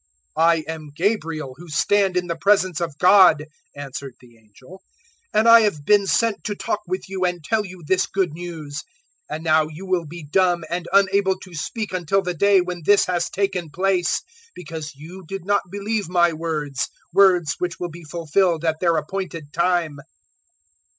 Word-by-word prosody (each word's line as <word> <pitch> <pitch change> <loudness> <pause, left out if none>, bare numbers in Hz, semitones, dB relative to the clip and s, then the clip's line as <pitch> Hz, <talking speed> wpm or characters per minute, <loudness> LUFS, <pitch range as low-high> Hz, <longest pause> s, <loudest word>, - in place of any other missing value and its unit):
001:019 160 - +2
"I 170 - +5
am 160 -2 -6
Gabriel, 165 -7 -1
who 175 +2 -12
stand 195 +4 +2
in 180 - 0
the 170 -1 -3
presence 185 -1 +2
of 165 -4 -3
God," 180 -4 +6 0.3
answered 140 -2 -7
the 120 -2 -19
angel, 115 - -17 0.5
"and 215 +2 +2
I 230 0 +9
have 160 -10 -1
been 205 +1 +4
sent 225 +1 +1
to 205 - -2
talk 205 - -2
with 185 +1 -4
you 190 -1 -3
and 175 -2 -1
tell 215 +7 0
you 185 -3 -11
this 185 +4 +1
good 190 -5 -1
news. 160 -4 -7 0.5
001:020 - - -3
And 160 - -7
now 155 -1 +3
you 160 +5 -10
will 180 -4 -1
be 170 +2 -9
dumb 175 +3 +1
and 175 0 -3
unable 195 0 +3
to 185 - -12
speak 205 +7 -4
until 185 +2 0
the 180 -1 -2
day 200 +3 +4
when 180 -1 -5
this 205 +5 +4
has 175 -2 -1
taken 195 -4 -2
place; 180 +2 0 0.3
because 155 -3 -7
you 170 +7 -11
did 195 0 -6
not 200 -3 0
believe 205 0 -3
my 175 -2 +3
words 155 -4 -3 0.2
words 180 -5 +4
which 180 0 -3
will 175 -1 -4
be 170 +1 -11
fulfilled 165 +1 0
at 160 -1 0
their 170 -2 +2
appointed 165 -2 -5
time." 170 -4 0
175 Hz, 185 wpm, -22 LUFS, 155-195 Hz, 0.5 s, I